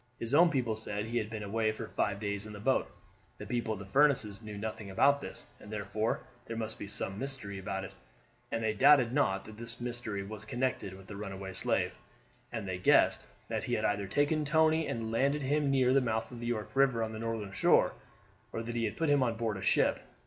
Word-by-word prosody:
His 115 +3 -3
own 170 +4 +7
people 125 -7 0
said 105 -1 -3
he 120 +1 -1
had 105 - -3
been 110 -1 -5
away 110 +2 +1
for 110 - -7
five 100 -1 -1
days 100 0 -3
in 105 - -9
the 105 - -8
boat. 130 +6 +1 0.5
The - - -7
people 110 -4 -2
at 100 -1 -10
Furniss' 130 -8 +3
knew 105 -2 -7
nothing 110 -1 -5
about 140 +9 +4
this, - - -7
and 105 - -12
therefore 110 +1 -1 0.3
there 115 - -4
must 110 -1 -2
be 105 - -5
some 100 0 -2
mystery 120 -8 -4
about 95 0 -3
it, 95 - -7 0.6
and 115 - -1
they 110 -1 +1
doubted 130 0 +6
not 95 -9 +1
that 110 -1 -11
that 115 0 -3
mystery 120 -4 -2
was 105 +1 -7
connected 120 -3 -2
with 95 - -13
the 100 - -8
runaway 95 -2 -6
slave, - - 0 0.6
and 110 -4 -4
they 95 -1 -3
guessed 90 - +4 0.2
that - - -2
he - - 0
had - - -1
either 100 -1 0
taken 145 +8 +2
Tony 160 +1 +3
and 115 -1 -3
landed 140 +5 +1
him 145 +1 +1
near 130 -2 +4
the 135 - +5
mouth 115 -2 -1
of 120 - -8
the 120 - -4
York 110 -3 -2
River 135 -4 +3
on 110 - -3
the 110 - -6
northern 115 -3 -3
shore, - - +4 0.6
or 115 - -3
that 120 +1 -4
he 115 -1 0
had 105 - -3
put 165 - +1
him 145 -1 +4
on 120 -3 +1
board 110 -2 -1
a 95 - -6
ship. 95 - +3
110 Hz, 230 wpm, -32 LUFS, 105-130 Hz, 0.6 s, own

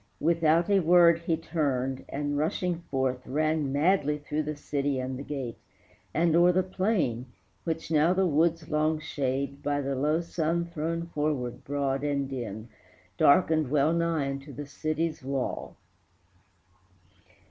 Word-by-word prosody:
Without 165 +1 +3
a 200 -1 +4
word 170 -1 +5
he 165 -1 -1
turned, 135 -5 -1
and, 145 +1 -2
rushing 170 +3 -1
forth, 130 -2 0
Ran 155 0 0
madly 150 0 +2
through 150 +1 -3
the 150 0 -4
city 145 -1 -2
and 130 0 -3
the 130 - -6
gate, 135 -5 -5 0.5
And 165 0 +2
o'er 175 +1 +6
the 185 +1 +2
plain, 185 - -1 0.4
which 160 -1 -3
now 155 +2 +4
the 190 +1 +2
wood's 165 0 +1
long 155 +1 +1
shade, 140 -2 -3
By 145 0 0
the 140 -1 -2
low 150 +4 +1
sun 170 0 -1
thrown 165 0 -3
forward 145 -6 -2
broad 140 -1 -1
and 140 -2 0
dim, 115 -4 -6 0.5
Darkened 155 -1 +4
wellnigh 160 +1 +1
unto 140 +1 -7
the 145 +3 -7
city's 155 +2 -3
wall. 135 -1 -3
150 Hz, 140 wpm, -28 LUFS, 140-165 Hz, 0.5 s, o'er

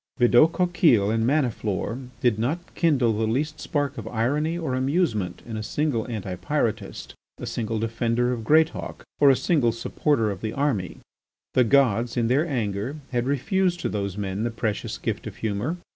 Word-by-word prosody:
Bidault 120 +6 +6
Coquille 165 - +3
and 115 +1 +1
Maniflore 125 -3 -1
did 120 -4 +2
not 160 +10 -2
kindle 135 -9 +2
the 110 +1 0
least 150 +7 -1
spark 145 -4 -2
of 110 - -7
irony 145 +9 0
or 160 -7 -2
amusement 130 - 0
in 115 - -6
a - - -3
single 115 +1 -1
Anti 100 -5 -4
Pyrotist, - - -2 0.2
a - - -6
single 115 -1 -2
defender 115 +2 0
of 115 -2 -4
Greatauk, 155 +6 +1 0.2
or 145 - +7
a 135 - +6
single 135 -6 +2
supporter 115 0 0
of 95 - -7
the 110 -1 -3
army. 135 -11 -1 0.6
The 125 - +4
gods, 120 -2 +3
in 115 -1 +1
their 145 +7 +2
anger, 115 -2 -2 0.2
had 120 0 0
refused 175 +7 +1
to - - -1
those 100 -2 -3
men 100 0 -3
the 120 - 0
precious 115 -2 -3
gift - - -3
of - - -7
humour. 110 - -2
120 Hz, 175 wpm, -25 LUFS, 110-145 Hz, 0.6 s, or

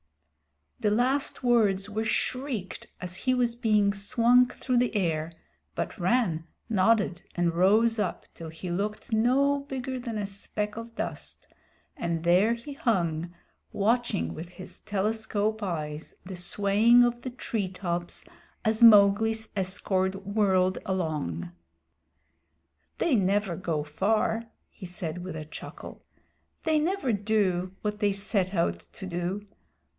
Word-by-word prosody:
The 215 -3 +2
last 255 +6 +1
words 210 -5 +2
were 215 +2 -1
shrieked 250 -3 -2
as 180 0 -5
he 255 +4 +1
was 240 -2 +1
being 215 -4 +2
swung 240 +4 +4
through 255 0 -2
the 245 -1 +1
air, 165 -4 0 0.4
but - - -3
Rann 175 -4 +1 0.2
nodded 205 -3 +2
and 175 -1 +1
rose 215 +6 +4
up 200 -4 -2
till 165 -1 -8
he 170 +3 -6
looked 210 +5 -3
no 270 +6 +3
bigger 265 -2 -5
than 235 -3 -4
a 205 - -2
speck 210 +1 -4
of 230 0 -8
dust, - - -5 0.5
and 170 - -2
there 185 +7 +4
he 260 +5 -9
hung, 175 - 0 0.4
watching 225 0 0
with 165 +3 -7
his 185 +1 -10
telescope 215 +1 -1
eyes 155 -5 -4
the 185 0 -6
swaying 205 +6 +4
of 240 0 0
the 255 - -4
treetops 185 -7 -4 0.4
as 220 +1 +1
Mowgli's 220 0 +6
escort 190 0 -1
whirled 190 -3 +2
along. 150 - -2 1.5
"They 330 - +1
never 195 -2 +1
go 160 -4 -2
far," 215 +8 0 0.2
he 185 - -10
said 175 -2 -5
with 180 -3 -6
a 155 -1 -6
chuckle. 155 - -10 0.6
"They 315 -1 +2
never 310 - 0
do 195 -3 0
what 210 0 -2
they 205 -2 +2
set 195 -1 -1
out 85 - +1
to 190 - -11
do. 180 +3 -3
205 Hz, 130 wpm, -28 LUFS, 180-230 Hz, 1.5 s, Mowgli's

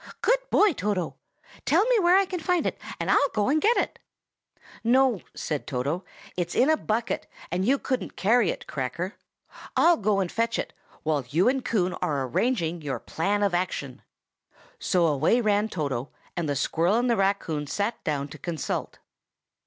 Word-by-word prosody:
"Good - - +4
boy, 415 -4 +4
Toto! 195 - -2 0.5
Tell - - +3
me - - +3
where 355 0 +5
I 390 - +4
can 365 -1 -4
find 350 +1 +1
it, - - -2 0.2
and - - 0
I'll 285 - +4
go 210 +1 +2
and 305 +2 +2
get 460 +3 +4
it." - - -1 0.8
"No!" 245 -3 +3
said 150 -3 -3
Toto. 145 +6 -2 0.3
"It's 175 -1 -2
in 270 +5 +4
a - - +5
bucket, 230 -5 -2 0.2
and 185 +3 0
you 275 +2 +4
couldn't 260 -1 -3
carry 220 0 +3
it, - - -4
Cracker! 145 - -3 0.6
I'll 340 0 +5
go 205 -1 +1
and 185 -3 -1
fetch 230 0 0
it, - - -4 0.3
while 150 -3 0
you 165 - +3
and 260 0 +2
Coon 185 -7 0
are 140 -3 0
arranging 170 - 0
your 140 -4 -3
plan 200 - -1
of 200 -3 +1
action." 175 -8 -2 0.8
So 180 -2 +2
away 155 - +3
ran 210 -1 +2
Toto, 140 - -3 0.3
and 170 -4 -2
the 145 - 0
squirrel 165 +7 +1
and 245 +1 +1
the 235 - +3
raccoon 195 -7 0
sat 205 +8 -2
down 145 -2 -1
to - - -11
consult. 165 -4 -3
195 Hz, 175 wpm, -26 LUFS, 160-245 Hz, 0.8 s, where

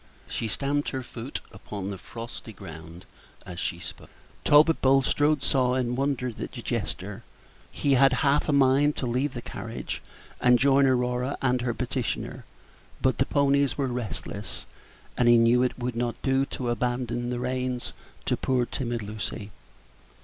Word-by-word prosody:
She 115 - -2
stamped 140 +6 0
her 130 -1 -3
foot 120 +2 -6
upon 100 -1 -6
the 100 - -5
frosty 115 +1 -8
ground 85 -2 -10 0.4
as 90 -2 -7
she 85 - -2
spoke. 85 - -8 0.3
Talbot 155 +2 +6
Bulstrode 135 +2 +3
saw 125 -2 +2
and 125 -1 0
wondered 130 -3 -1
at - - -5
the - - -7
gesture. 100 +3 -3 0.5
He 140 - +1
had 135 +1 +6
half 145 +2 +3
a - - +5
mind 140 +1 +4
to - - -2
leave 125 +4 0
the 120 - -5
carriage - - -5 0.4
and 125 0 +6
join 140 +2 +5
Aurora 125 +1 +1
and 125 -1 +1
her 120 -1 -1
petitioner; 125 -1 -3 0.5
but 130 - +1
the 135 - +2
ponies 140 -1 +2
were 140 - +1
restless, 120 - -4 0.5
and 120 -1 +4
he 120 - +8
knew 115 +2 +5
it 125 - 0
would 125 -1 -3
not 120 0 -1
do 135 0 +2
to 125 -3 -2
abandon 120 0 -1
the 125 - -1
reins 125 0 -2 0.3
to - - +2
poor 125 -2 +1
timid 120 -3 -3
Lucy. 105 0 -5
125 Hz, 160 wpm, -27 LUFS, 120-135 Hz, 0.5 s, he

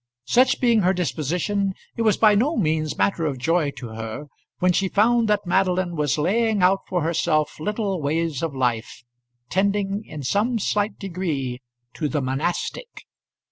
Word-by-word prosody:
Such 255 - +3
being 235 -4 +3
her 185 0 +3
disposition, 180 +4 -1 0.2
it - - -3
was 215 -3 +3
by 215 -2 +5
no 265 +11 +1
means 155 -4 0
matter 165 -5 +1
of 140 -3 -3
joy 160 +3 +1
to 120 -2 -7
her 115 +5 -6 0.3
when 180 0 +3
she 190 +1 +1
found 230 +3 +3
that 210 -1 +1
Madeline 185 -1 +1
was 150 -2 0
laying 205 +5 +1
out 190 +2 +4
for 180 -4 -1
herself 155 -2 0
little 200 0 -2
ways 155 0 -1
of 165 -4 -3
life, 120 -2 -2 0.5
tending 200 +1 0
in 150 -2 -8
some 215 - +1
slight 205 0 -1
degree 155 -10 -3 0.3
to 150 -3 -2
the 150 - -1
monastic. 150 - -3
180 Hz, 160 wpm, -23 LUFS, 150-205 Hz, 0.5 s, by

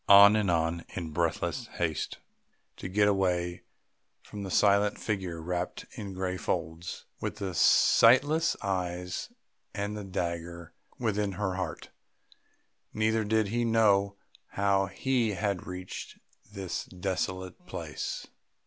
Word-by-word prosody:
On, 100 +1 +10
on, 85 0 +1
in 85 -3 -4
breathless 85 +1 -1
haste 80 -3 -2 0.6
to - - -5
get 105 +2 +3
away 90 -3 +1 0.6
from 105 - -8
that 95 - -5
silent 100 +2 +3
figure 95 -6 -3
wrapped 90 +2 -3
in 100 -3 -7
grey 95 0 -2
folds, 80 0 -3
with - - -3
the 95 -2 -4
sightless 145 - +5
eyes 90 -2 -2 0.4
and 100 +1 -2
the 105 - -5
dagger 85 -2 -4 0.2
within 105 -4 0
her 95 0 -1
heart... 90 -3 -5 1.0
neither 110 +1 +2
did 110 -1 +1
he 120 +2 0
know 100 -4 +3 0.4
how 100 -1 +2
he 120 +2 0
had 100 -1 -2
reached 90 0 -7 0.3
this 95 -3 -4
desolate 95 0 -4
place. - - -5
95 Hz, 120 wpm, -29 LUFS, 90-105 Hz, 1.0 s, On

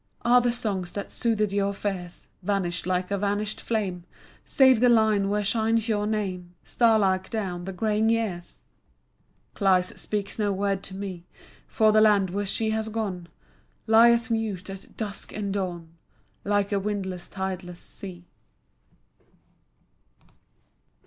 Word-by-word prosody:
Are 245 +1 +5
the 245 0 +2
songs 195 -7 -3
that 200 - -5
soothed 215 -4 0
your 200 0 0
fears 185 -4 -5
Vanished 180 -3 -1
like 180 +1 -1
a 200 - 0
vanished 205 +1 -1
flame, 195 -6 -2 0.4
Save 260 -4 +5
the 245 +1 +5
line 215 -4 +3
where 210 +1 0
shines 225 +2 +1
your 210 -2 0
name 185 -5 -3
Starlike 205 -5 +2
down 185 -6 -3
the 195 - -4
graying 215 +3 +1
years? 215 -7 -2 0.9
Cleis 185 -3 +2
speaks 205 0 -3
no 205 -1 +1
word 195 0 -1
to 190 - -8
me, 190 -3 -6 0.4
For 220 -3 +3
the 215 0 +5
land 205 -4 +4
where 200 +1 -2
she 220 +2 0
has 220 0 -1
gone 200 -6 -3 0.6
Lieth 235 +1 +5
mute 205 -5 -2
at 195 0 -12
dusk 205 -3 -4
and 200 -2 -3
dawn 175 -4 -3 0.5
Like 205 0 +1
a 200 - +2
windless 190 -3 -4
tideless 185 -2 -5
sea. 180 -3 -10
200 Hz, 135 wpm, -26 LUFS, 185-220 Hz, 0.9 s, Are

